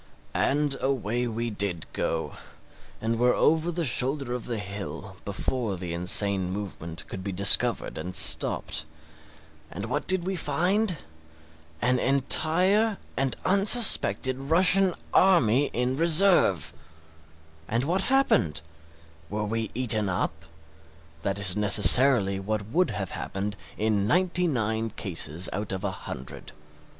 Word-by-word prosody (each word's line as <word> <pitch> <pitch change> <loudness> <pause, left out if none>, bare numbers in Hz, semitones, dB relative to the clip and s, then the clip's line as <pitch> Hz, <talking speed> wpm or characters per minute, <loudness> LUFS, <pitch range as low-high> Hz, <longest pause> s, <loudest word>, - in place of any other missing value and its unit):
And 145 0 -1
away 125 -2 -3
we 115 0 -5
did 100 -5 -3
go, 80 -2 -4 0.6
and 115 +1 -3
were 125 0 +2
over 160 +2 0
the 170 -1 -3
shoulder 130 +1 -1
of 125 -2 -6
the 120 -2 -5
hill 100 -1 -9
before 115 -7 -4
the 85 -1 -7
insane 95 +2 0
movement 85 -5 -6
could 95 - -9
be 100 - -5
discovered 100 -3 +2
and 90 +3 -5
stopped. - - +3 0.8
And 100 +4 -8
what 145 +6 -5
did 185 -2 0
we 190 +1 -3
find? 185 +3 -1 0.9
An 125 0 +1
entire 180 - +2 0.2
and 135 -1 -1
unsuspected 195 - +7
Russian 180 +6 +1 0.2
army 145 - +2
in 125 +2 -2
reserve! 165 - +3 0.9
And 115 +3 -2
what 175 +7 -2
happened? 265 - 0 0.7
We 105 +1 -5
were 110 +1 -4
eaten 110 -5 -1
up? 95 +2 -3 0.9
That 100 +3 -3
is 100 -2 +2
necessarily 105 0 +5
what 105 +1 -5
would 175 +6 0
have 100 -4 -6
happened 100 +2 -6 0.2
in 105 -2 -1
ninety 180 +3 0
nine 110 -5 -3
cases 85 -4 -4
out 105 +1 -5
of 95 0 -6
a 100 - -3
hundred. 65 -8 -10
115 Hz, 125 wpm, -24 LUFS, 100-160 Hz, 0.9 s, unsuspected